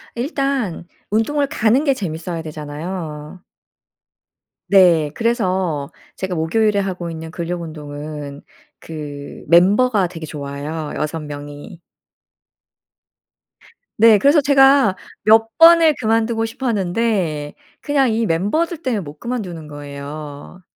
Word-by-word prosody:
일단 265 - -2 0.2
운동을 280 +7 +1
가는 255 -1 +2
게 280 -3 +3
재미있어야 170 -4 -5
되잖아요. 155 +1 -7 1.3
네. 170 -6 +5
그래서 185 - -1 0.3
제가 190 -1 -3
목요일에 205 +6 +1
하고 185 -3 -3
있는 160 -1 -7
근력 170 +1 -4
운동은 150 -2 -7 0.4
그 145 -3 -8
멤버가 195 - +4
되게 165 -2 -8
좋아요, 150 +1 -5
6 155 +1 -3
명이. 145 +4 -9 2.2
네. 220 -1 +6
그래서 285 +7 +5
제가 270 -6 +5 0.3
몇 225 +1 +4
번을 330 -2 +7
그만두고 225 0 +1
싶었는데 200 - -1 0.3
그냥 275 -5 +1
이 225 +1 0
멤버들 305 - 0
때문에 240 -5 0
못 150 -4 -9
그만두는 185 -11 -5
거예요. 145 +3 -9
180 Hz, 235 characters per minute, -19 LUFS, 155-230 Hz, 2.2 s, 번을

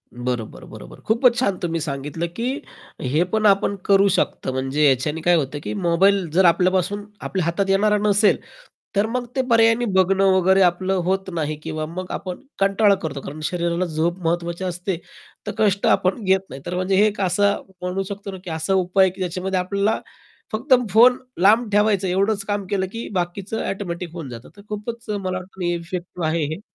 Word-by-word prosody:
बरोबर. 120 -2 -4
बरोबर. - - -12
खूपच 235 +2 +4
छान. 200 -7 +1
तुम्ही 165 -2 -2
सांगितलं, 150 +3 -3
की 255 +6 -2 0.4
हे 145 +6 +1
पण 220 0 +1
आपण 200 0 +3
करू 200 0 +5
शकतो. - - -1
म्हणजे 135 +3 0
याच्याने 150 +5 0
काय 175 +2 +4
होतं, 145 -2 -1
की - - -4
मोबाईल 190 0 +2
जर 185 +2 +4
आपल्यापासून 185 +4 +2 0.2
आपल्या 185 -4 -2
हातात 180 +4 0
येणारा 210 +2 +3
नसेल, 205 +1 +4 0.6
तर 200 +1 +3
मग 245 +2 -2
ते 265 - +2
पर्यायाने 230 +1 +4
बघणं 190 +1 +4
वगैरे, 190 +1 +4
आपलं 185 +1 +2
होत 190 +2 -1
नाही. 155 -2 -2
किंवा 155 -1 -3
मग 180 +3 -6
आपण 185 -2 -5 0.2
कंटाळा 200 +1 +4
करतो. 140 -3 -4
कारण 150 +3 -8
शरीराला 170 +2 -1
झोप 170 +2 -1
महत्त्वाची 170 +2 -1
असते. 180 0 -3 0.5
तर - - -1
कष्ट 205 -2 +2
आपण 190 +5 +2
घेत 190 0 +3
नाही, 135 - -9
तर 175 +1 -3
म्हणजे 185 +1 0
हे 205 +3 +5
एक 205 -1 -3
असं 200 +2 +2 0.2
म्हणू 180 +2 -2
शकतो 200 0 -6
ना, 190 - -7
की 180 - -7
असा 160 +4 -1
उपाय 190 +1 +3
आहे, 185 - 0
की 190 - -10
ज्याच्यामध्ये 185 +1 -1
आपल्याला 200 +4 0 0.5
फक्त 255 +6 +1 0.2
फोन 245 +3 +6 0.2
लांब 220 +4 +5
ठेवायचं, 205 -2 +2
एवढंच 195 +3 +1
काम 205 -1 -2
केलं. 190 -2 0
की 230 +2 -6
बाकीचं 185 +4 -3
ऑटोमॅटिक 175 -3 -5
होऊन 165 -6 -7
जातं. 120 0 -10
तर - - -12
खूपच 230 +2 -6
मला 190 -3 -2
वाटतं 185 +1 -11
नाही, 175 -1 0
इफेक्टिव्ह 170 0 -4
आहे 160 0 0
हे. 185 - -12
185 Hz, 185 wpm, -22 LUFS, 170-200 Hz, 0.6 s, फोन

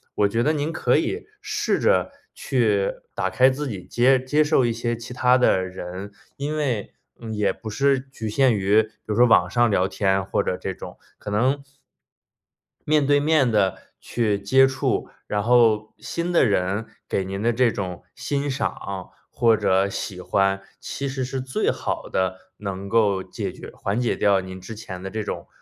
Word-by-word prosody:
我 105 - +3
觉 115 +2 0
得 150 +6 +2
您 150 +1 -1
可 125 -5 +2
以 405 - -2
试 - - -1
着 485 - +2 0.2
去 110 -7 +1 0.2
打 95 - -1
开 130 +6 +5
自 145 +3 -3
己 95 -6 -6
接 130 +2 +3
接 145 +4 +2
受 150 -4 +3
一 120 - +1
些 120 0 -2
其 120 +2 -8
他 125 0 +4
的 95 -7 +3
人， 95 +2 -7 0.3
因 150 +2 -3
为 125 -9 -2 0.3
嗯， 115 -1 -6
也 105 -2 +1
不 110 - -8
是 135 +5 +2
局 130 -4 -7
限 125 +2 +3
于 100 +2 +4
比 110 - -8 0.2
如 105 - -2
说 120 +3 +6
网 90 -6 +5
上 120 +4 +3
聊 95 -2 +2
天 95 -1 0
或 - - 0
者 - - -1
这 - - -4
种。 - - -10 0.2
可 - - -7
能， 130 +7 +1 1.2
面 150 -1 +3
对 145 0 +4
面 145 -3 +3
地 95 -3 +2 0.2
去 110 -4 0
接 130 +7 +5
触， 135 0 -1 0.2
然 105 - 0
后 115 -2 +3
新 170 +1 -3
的 170 - +5
人 100 0 0 0.2
给 95 - 0
您 95 +1 -4
的 120 +2 +2
这 120 0 +3
种 90 -5 -5
欣 145 0 -2
赏， 130 - -4 0.2
或 115 -1 +3
者 95 0 +2
喜 95 -1 -5
欢， 95 +1 +1 0.2
其 140 - -4
实 135 -1 -3
是 135 +1 -4
最 130 0 0
好 - - -4
的 95 0 0 0.2
能 100 -1 -5
够 100 -4 +2
解 - - -5
决 - - -10
缓 100 +5 -2
解 120 - +1
掉 100 -2 +3
您 95 0 -8
之 110 +5 -9
前 95 -4 -8
的 95 - -4
这 110 +1 -3
种， - - -5
115 Hz, 200 characters per minute, -23 LUFS, 100-130 Hz, 1.2 s, 说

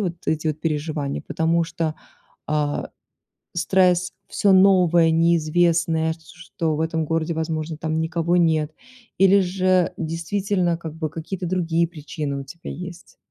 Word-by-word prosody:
вот 180 -4 -1
эти 160 0 0
вот 155 0 -3
переживания, 150 -2 -2
потому 165 +1 +1
что, 160 -1 -3 0.5
а, 150 -1 -1 0.6
стресс 180 0 +2 0.2
всё 200 - +2
новое, 180 -4 +5
неизвестное, 165 0 +2
с 165 - -22
что 160 -2 -3
в 155 - -3
этом 160 0 -1
городе, 165 +1 -1
возможно, 160 0 -3
там 160 0 -1
никого 165 +2 0
нет, 160 -3 +2 0.5
или 195 +1 +6
же 185 -1 +2
действительно, 175 +2 -1
как 160 -2 -7
бы 160 -2 -3
какие-то 170 +3 -5
другие 170 -2 +1
причины 150 -3 -5
у - - -7
тебя 170 +5 -9
есть? 180 0 -9
165 Hz, 140 wpm, -23 LUFS, 160-175 Hz, 0.6 s, или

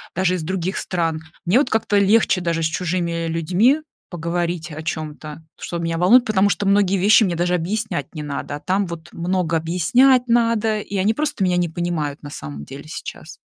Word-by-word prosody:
даже 185 0 +1
из 175 - -4
других 185 +2 -2
стран, 165 -3 -1 0.3
мне 180 +7 +3
вот 275 - +1
как-то 220 -2 +1
легче 200 -1 +3
даже 165 -1 -1
с - - +2
чужими 170 0 -2
людьми 185 - +2 0.3
поговорить 175 0 -3
о 155 +1 -6
чем-то, 155 -1 -6 0.2
что 170 - -4
меня 165 0 -2
волнует. 225 +9 +6
Потому 205 -2 +3
что 200 - -1
многие 200 -1 +3
вещи 205 +4 +5
мне 175 -3 -1
даже 175 +1 +1
объяснять 180 - -2
не 155 - -5
надо, 145 0 -4
а - - -7
там 190 +1 0
вот 170 -1 -8
много 170 -1 0
объяснять 245 - +3
надо, 230 -2 +2
и 205 - -7
они 200 +4 +2
просто 295 -5 -1
меня 180 -1 +2
не 175 -1 +1
понимают 160 -4 -3
на 145 - -7
самом 75 - -7
деле 140 +2 -10
сейчас. 155 +1 -8
175 Hz, 190 wpm, -21 LUFS, 165-200 Hz, 0.3 s, волнует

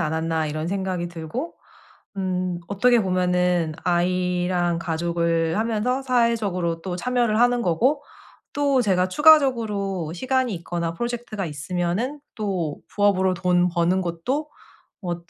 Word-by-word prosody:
않았나.' 160 0 -1
이런 155 +2 -3
생각이 185 -2 -2
들고 175 - -5 0.6
음. 185 -2 -1
어떻게 235 +5 +3
보면은 180 -3 +1
아이랑 180 -1 +1
가족을 170 0 0
하면서 230 +4 0
사회적으로 215 -9 0
또 180 0 -4
참여를 235 +2 +1
하는 245 0 +3
거고 250 - +1 0.5
또 280 -3 +2
제가 185 -4 +2
추가적으로 215 - +3
시간이 260 +2 0
있거나 170 0 -3
프로젝트가 235 -2 -4
있으면은 175 - -2 0.2
또 185 -8 -2 0.2
부업으로 190 -2 +3
돈 180 0 +2
버는 175 +1 +1
것도 250 - -3 0.5
어 175 -1 -1
185 Hz, 285 characters per minute, -23 LUFS, 170-235 Hz, 0.6 s, 어떻게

